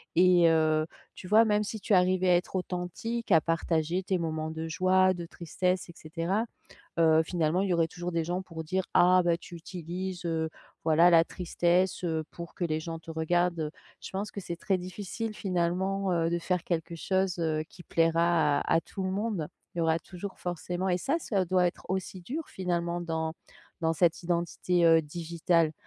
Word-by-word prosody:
et 175 -1 +6
heu, 155 -1 +3 0.3
tu 185 - -9
vois 220 +2 +7
même 210 -1 +2
si 215 +1 -5
tu 210 - 0
arrivais 185 0 +4
à 180 - +6
être 180 +2 -1
authentique 185 +6 -4
à 165 - +8
partager 165 +2 0
tes 190 0 0
moments 160 -2 -2
de 160 0 -4
joie, 185 +2 +3
de 175 -2 -6
tristesse 180 +2 -2
et - - -10
cetera, 170 +7 -2 0.6
heu, 160 -1 +5
finalement 170 +1 0
il 195 - 0
y 180 - +2
aurait 165 -1 +2
toujours 175 +1 -5
des 165 -1 +1
gens 175 +2 -2
pour 165 -4 -7
dire: 185 +4 -1
«Ah 180 +1 +6
bah, 170 -1 +3
tu 175 - -11
utilises, 180 +1 -6
heu, 160 -1 0 0.4
voilà, 165 +2 +6
la 165 -1 +6
tristesse, 180 +1 0
heu, 160 -2 0
pour 170 -1 -9
que 180 - -2
les 155 -2 0
gens 165 0 -5
te 165 - -11
regardent», 170 +2 +1
heu, 150 - -2 0.3
je - - -8
pense 195 +2 -3
que 200 - -6
c'est 175 -2 -5
très 190 +2 0
difficile 205 +4 -5
finalement, 190 +1 0
heu, 165 -1 +1
de 170 - +1
faire 180 0 -1
quelque 170 -1 -2
chose, 190 +2 0
heu, 155 -2 0
qui 175 - -14
plaira 165 -3 +2
à - - +1
à - - +3
tout 190 - -7
le 185 - -1
monde. 195 -6 -2 0.3
Il - - -6
y - - +2
aura 160 0 +2
toujours 190 +3 -8
forcément 180 +1 -3
et 180 0 +2
ça, 275 - 0
ça 200 - 0
doit 180 0 +3
être 175 - -4
aussi 190 0 -3
dur 285 - -5
finalement 175 -2 -2
dans 160 -1 -2 0.5
dans 165 -1 +2
cette 170 +1 +2
identité, 175 0 +1
heu, 165 0 +7
digitale, 165 +1 0
175 Hz, 200 wpm, -29 LUFS, 165-185 Hz, 0.6 s, à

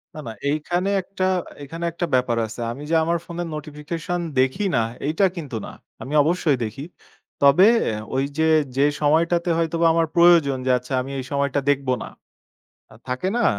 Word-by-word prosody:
না, - - -7
না - - -4 0.2
এইখানে 175 +6 -1
একটা 185 0 -5 0.4
এখানে 165 +5 -7
একটা 175 +1 -2
ব্যাপার 125 -2 +1
আছে। 110 +2 -8
আমি 140 +5 -8
যে, 165 - +2
আমার 170 +1 +1
ফোনের 170 0 -5
নোটিফিকেশন 155 +4 -5 0.2
দেখি 130 +11 +1
না 115 - +3 0.3
এইটা 160 +6 +2
কিন্তু 145 -8 -6
না, - - -8 0.3
আমি 140 +3 -6
অবশ্যই 160 -3 +1
দেখি। 115 +6 -7 0.6
তবে 140 +9 +6 0.2
অ্যা 110 - -1 0.2
ওই 135 - +1
যে, 160 - +2 0.3
যে, 140 - +4 0.2
সময়টাতে 170 +4 +2
হয়তোবা 165 0 0
আমার 165 0 +2
প্রয়োজন 170 -6 +5
যে, 130 - +2
আচ্ছা 125 +2 -7
আমি 135 +2 -7
এই 130 - -5
সময়টা 140 0 0
দেখবো 135 -2 +1
না। - - -8 0.8
আ - - -14
থাকে 130 +8 -2
না? 240 - +1
155 Hz, 175 wpm, -22 LUFS, 135-170 Hz, 0.8 s, তবে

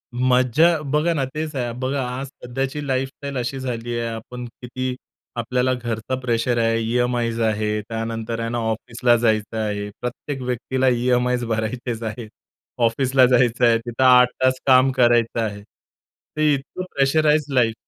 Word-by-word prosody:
मज्जा. 130 +6 +3
बघा 150 +4 +1
ना, 140 -4 0
तेच 150 +3 -5
आहे 120 -3 -2
बघा 135 +1 -1
आज 130 +2 -4
सध्याची 135 +3 -4
लाईफस्टाईल 135 +1 -3
अशी 125 +2 -3
झालीये 120 -2 -3
आपण 120 +2 -7 0.2
किती 130 +1 -4 0.4
आपल्याला 125 +2 0
घरचा 120 0 -3
प्रेशर 120 -1 0
आहे, 115 0 +2
ई-एम-आयज 120 0 0
आहे. 105 -1 0
त्यानंतर 115 +1 -4
आहे 115 0 -2
ना 120 - -2
ऑफिसला 115 +2 +1
जायचं 110 -1 0
आहे. 105 -1 -2
प्रत्येक 130 +2 -5
व्यक्तीला 130 +1 -1
ई-एम-आयज 125 0 +2
भरायचेच 115 +1 -3
आहेत. 110 0 -5 0.6
ऑफिसला 130 +2 +3
जायचं 125 -1 +3
आहे. 115 -1 +5
तिथे 120 +2 -1
8 125 -1 +7 0.2
तास 130 0 +3
काम 130 0 +6
करायचं 120 -2 +3
आहे. 105 -2 -3 0.8
ते 155 -1 +3
इतकं 140 +6 -4
प्रेशराईज्ड 150 +1 +2
लाईफ. 120 -4 +3
125 Hz, 145 wpm, -22 LUFS, 115-130 Hz, 0.8 s, 8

